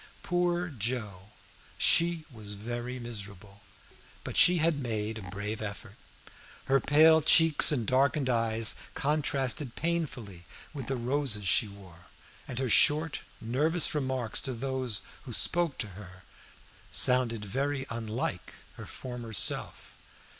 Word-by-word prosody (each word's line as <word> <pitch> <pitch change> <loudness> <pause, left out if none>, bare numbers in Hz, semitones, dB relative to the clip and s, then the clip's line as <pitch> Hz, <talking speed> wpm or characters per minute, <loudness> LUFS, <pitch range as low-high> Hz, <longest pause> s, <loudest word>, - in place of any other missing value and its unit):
Poor 175 0 0
Joe! 105 - -4 0.5
she 170 -1 +3
was 105 -4 -8
very 120 +4 -5
miserable, 105 -4 -9 0.6
but - - -6
she 180 0 +6
had 160 -3 +1
made 110 -2 -3
a 95 -4 -10
brave 100 +3 -5
effort. 105 0 -7 0.7
Her 135 0 +3
pale 160 +3 +5
cheeks 160 0 +5
and 125 -7 -1
darkened 135 +3 +1
eyes 115 -2 +2 0.2
contrasted 140 -3 -1
painfully 130 - -3 0.3
with 135 -5 -7
the 135 - -1
roses 125 -4 -1
she 105 +5 +4
wore, 95 -4 -15 0.4
and 125 - -7
her 130 0 -1
short 150 +6 +3 0.2
nervous 150 +9 0
remarks 130 -6 -2
to 130 - -3
those 125 -4 -2 0.2
who 125 - -6
spoke 170 +4 +3
to 110 - -4
her 95 -1 -13 0.7
sounded 120 -4 +3
very 135 +6 -2
unlike 115 -5 -4 0.2
her - - -9
former 125 -3 -8
self. 90 - -1
125 Hz, 125 wpm, -29 LUFS, 105-145 Hz, 0.7 s, she